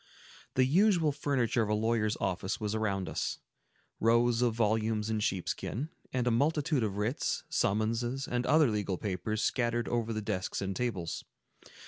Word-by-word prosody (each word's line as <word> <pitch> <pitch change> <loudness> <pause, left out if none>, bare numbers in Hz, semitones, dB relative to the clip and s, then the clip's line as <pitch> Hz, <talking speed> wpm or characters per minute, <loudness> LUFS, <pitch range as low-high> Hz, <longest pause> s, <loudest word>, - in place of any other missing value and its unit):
The 130 - +4
usual 170 +1 +4
furniture 130 -4 0
of 110 - 0
a 105 - +2
lawyer's 110 0 +1
office 95 +1 -2
was 105 -1 -2
around 100 -4 -1
us,—rows 115 +1 -1
of 120 -2 +2
volumes 110 -1 +1
in 110 - 0
sheepskin, 105 - -2 0.2
and 125 -1 0
a 125 - +3
multitude 150 +3 +2
of 105 -3 -1
writs, 110 +7 -1
summonses, 115 +6 0
and 125 0 -1
other 155 -6 +5
legal 100 -3 -1
papers, 105 +3 -2
scattered 120 -2 0
over 115 -1 -1
the 110 -1 -3
desks 95 -3 -2
and 95 -1 -3
tables. 95 -8 -2
115 Hz, 150 wpm, -31 LUFS, 105-125 Hz, 0.2 s, other